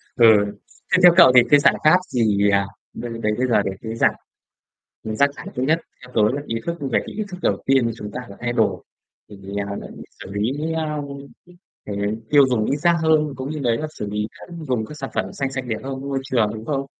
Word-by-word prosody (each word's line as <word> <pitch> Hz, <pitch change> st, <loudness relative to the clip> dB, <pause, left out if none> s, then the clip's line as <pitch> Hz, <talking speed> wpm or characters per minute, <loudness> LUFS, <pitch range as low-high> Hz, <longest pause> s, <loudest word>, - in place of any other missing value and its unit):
Ờ, 120 Hz, -2 st, +5 dB, 0.7 s
thế -, -, +6 dB
theo 175 Hz, -1 st, +9 dB
cậu 170 Hz, -7 st, +9 dB
thì 125 Hz, -, +10 dB
cái 145 Hz, -1 st, +7 dB
giải -, -, +4 dB
pháp 155 Hz, +4 st, +7 dB
gì, 105 Hz, -4 st, +2 dB
à, 100 Hz, 0 st, +2 dB, 0.3 s
đây 120 Hz, -1 st, -6 dB
đấy 105 Hz, -, +2 dB
bây 130 Hz, +1 st, +1 dB
giờ 115 Hz, -4 st, +3 dB
để 95 Hz, -, -2 dB
cái 115 Hz, 0 st, -5 dB
giảm -, -, +3 dB, 0.9 s
rác 110 Hz, +6 st, +2 dB
thải -, -, -9 dB
thứ 125 Hz, -, -1 dB
nhất, 160 Hz, +4 st, +2 dB, 0.2 s
theo 125 Hz, 0 st, -14 dB
tớ 110 Hz, -, +4 dB
là 145 Hz, -, -3 dB
ý 115 Hz, -, -2 dB
thức, 170 Hz, -, -2 dB
về 135 Hz, -3 st, +1 dB
cái -, -, -8 dB
ý 215 Hz, -, -2 dB
thức 180 Hz, -, -6 dB
đầu -, -, 0 dB
tiên 130 Hz, -4 st, +3 dB
chúng 105 Hz, -2 st, -8 dB
ta 125 Hz, -, -5 dB
phải 100 Hz, -, -11 dB
thay 120 Hz, 0 st, -1 dB
đổi. 110 Hz, -3 st, +1 dB, 0.5 s
Thì, 105 Hz, -, -11 dB, 0.3 s
à, 100 Hz, -, -4 dB
l -, -, -10 dB, 0.4 s
xử 95 Hz, -, -10 dB
lý, 135 Hz, +11 st, -2 dB
ơ, 155 Hz, -2 st, -2 dB, 0.8 s
cái 100 Hz, -1 st, -4 dB, 0.3 s
tiêu 140 Hz, -2 st, +6 dB
dùng 115 Hz, -4 st, +1 dB
ít 140 Hz, -, 0 dB
rác 170 Hz, +3 st, +3 dB
hơn, 155 Hz, -2 st, +3 dB
cũng 130 Hz, +3 st, -5 dB
như 155 Hz, -, -4 dB
đấy 120 Hz, -4 st, +1 dB
là 155 Hz, -, -3 dB
xử 105 Hz, -, -4 dB
lý 105 Hz, 0 st, -2 dB, 0.4 s
dùng 120 Hz, -4 st, 0 dB
các 150 Hz, -, -10 dB
sản 135 Hz, -, -5 dB
phẩm -, -, -2 dB
xanh 135 Hz, -1 st, -3 dB
sạch 130 Hz, -1 st, -4 dB
đẹp 110 Hz, -2 st, -2 dB
hơn 135 Hz, 0 st, -5 dB
với 140 Hz, -, -6 dB
môi 135 Hz, -1 st, -1 dB
trường, 115 Hz, -7 st, +1 dB
đúng 110 Hz, +1 st, -8 dB
không? 140 Hz, -2 st, -2 dB
130 Hz, 240 wpm, -22 LUFS, 110-145 Hz, 0.9 s, thì